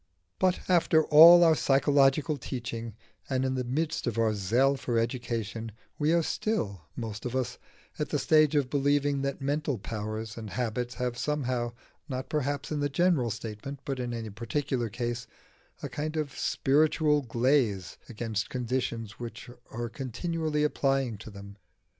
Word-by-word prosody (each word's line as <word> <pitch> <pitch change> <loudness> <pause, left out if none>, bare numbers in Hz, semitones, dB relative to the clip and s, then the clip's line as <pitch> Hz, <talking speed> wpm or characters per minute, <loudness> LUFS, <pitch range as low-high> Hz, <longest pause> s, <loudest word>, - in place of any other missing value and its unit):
But 185 -1 +2
after 165 -3 +4
all 170 +3 +9
our 165 -1 +6
psychological 140 +1 +3
teaching, 115 -4 -5 0.3
and 130 -1 0
in 130 - 0
the 130 -1 -1
midst 150 +4 -2
of 115 -2 -2
our 115 -1 +2
zeal 120 +8 +2
for 120 -3 -2
education, 115 -2 -2 0.3
we 150 +1 +2
are 170 0 +3
still, 100 - -2
most 110 -3 -5
of 125 0 -4
us, 125 -1 -2 0.4
at 150 - -1
the 150 - 0
stage 155 +1 +4
of 145 -3 +2
believing 145 0 +2
that 140 0 -3
mental 145 -1 -1
powers 110 +1 -5
and 110 -2 -6
habits 120 +1 -3
have 125 -1 -3
somehow, 130 -5 -1 0.4
not 130 0 -4
perhaps 145 -1 -2
in 150 - -1
the 145 0 0
general 150 -5 +2
statement, 110 +5 -6
but 135 -2 -3
in 125 -1 -3
any 115 -2 -5
particular 120 +2 -2
case, 120 +1 -4 0.6
a - - -1
kind 155 +2 -4
of 145 -4 -3
spiritual 150 +1 +2
glaze 115 - +1
against 110 -3 -3
conditions 120 -3 -3
which 120 0 -7
we - - -10 0.2
are 120 0 -4
continually 150 +5 -2
applying 135 -5 +1
to 110 - -9
them. 100 -1 -11
130 Hz, 160 wpm, -28 LUFS, 115-145 Hz, 0.6 s, all